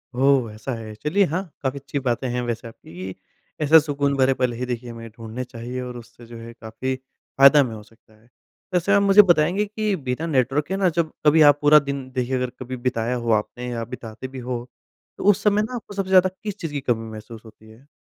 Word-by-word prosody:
ओह! 130 -3 +3
ऐसा 110 +5 -5
है, 110 -1 -8
चलिए 150 - +1
हाँ 185 +3 -1 0.2
काफ़ी 135 +1 -2
अच्छी 140 +1 -4
बातें 125 0 -1
हैं 125 0 -1
वैसे 120 -1 -4
आपकी, 95 -4 -9 0.5
ऐसा 155 +2 +7
सुकून 140 -2 -1
भरे 130 0 +4
पल 125 -1 0
ही 125 +2 -4
देखिए 125 -1 -5
हमें 115 0 -9
ढूँढने 115 +2 -7
चाहिए 125 +1 -6
और 125 -1 -6
उससे 120 0 -14
जो 115 0 -11
है 115 +1 -10
काफ़ी 115 +4 -4
फ़ायदा 135 +2 +3
हमें 125 -5 +1
हो 105 - -9
सकता 110 0 -25
है। 120 - -27 0.4
वैसे 180 +3 +1
आप 200 - +5
मुझे 200 +1 +8
बताएँगे 180 +2 +2
कि 215 -1 -1
बिना 135 0 -3
नेटवर्क 135 0 +1
के 190 - -2
ना 190 -2 +3
जब 165 -1 -1
कभी 155 +1 +6
आप 145 -1 +6
पूरा 150 +1 +7
दिन 140 -2 -5
देखिए 130 0 -1
अगर 125 -1 -1
कभी 130 0 -6
बिताया 120 -1 -1
हो 120 -2 -1
आपने 120 +3 -1
या 115 -1 -3
बिताते 115 +2 -8
भी 130 0 -9
हो, 125 0 -5 0.5
तो - - -6
उस 185 - -3
समय 210 0 +3
ना 235 +4 -4
आपको 220 -3 -8
सबसे 195 -1 -3
ज़्यादा 185 0 +6
किस 210 -2 -4
चीज़ 165 - -4
की 145 -1 -3
कमी 115 -3 -1
महसूस 110 +1 -10
होती 110 0 -16
है? 120 +6 -18
130 Hz, 225 wpm, -23 LUFS, 115-150 Hz, 0.5 s, मुझे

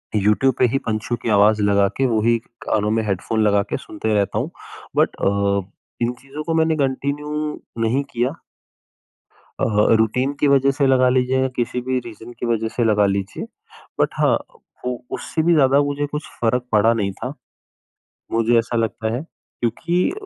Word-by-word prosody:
YouTube 105 +6 +3
पे - - +5
ही 135 - +2
पंछियों 110 +2 -1
की - - -2
आवाज़ 105 +1 +4
लगा 100 -1 +3
के, 135 - +2
वो 115 -4 +1
ही 115 +1 +3 0.2
कानों 105 0 0
में 110 0 +1
हेडफ़ोन 100 +3 -1
लगा 100 -1 +3
के - - -1
सुनते 135 -6 -3
रहता 100 -2 +1
हूँ - - -2 0.5
बट - - +2
अ, 100 0 +1 0.4
इन 120 +1 +1
चीज़ों 140 +3 -7
को 165 - -2
मैंने 160 0 +2
कंटिन्यू 140 +2 -1 0.5
नहीं 125 +5 +1
किया। 125 +6 -1 1.2
अ, - - +2 0.3
रूटीन 125 +5 +1
की 145 - +3
वजह 140 0 +4
से 140 +1 0
लगा 130 -1 +4
लीजिए 130 +1 +2
या 130 - +2
किसी 120 +1 -1
भी 130 +1 -1
रीज़न 115 0 -10
की - - -2
वजह 115 -1 0
से 120 - +1
लगा 105 -2 +3
लीजिए। 100 0 -2 0.5
बट - - +3
हाँ - - +4 0.5
उ 125 -1 -1 0.2
उससे 160 - -2
भी 170 - +4
ज़्यादा 140 -3 +4
मुझे 145 0 -1
कुछ 150 +1 -5
फ़र्क़ 120 +1 +1
पड़ा 110 +2 +4
नहीं 100 -3 -1
था। - - -6 1.0
मुझे 115 +1 +3
ऐसा 115 +1 -2
लगता 110 0 -1
है 125 - -2
क्योंकि 170 +3 -2
120 Hz, 180 wpm, -21 LUFS, 110-135 Hz, 1.2 s, पे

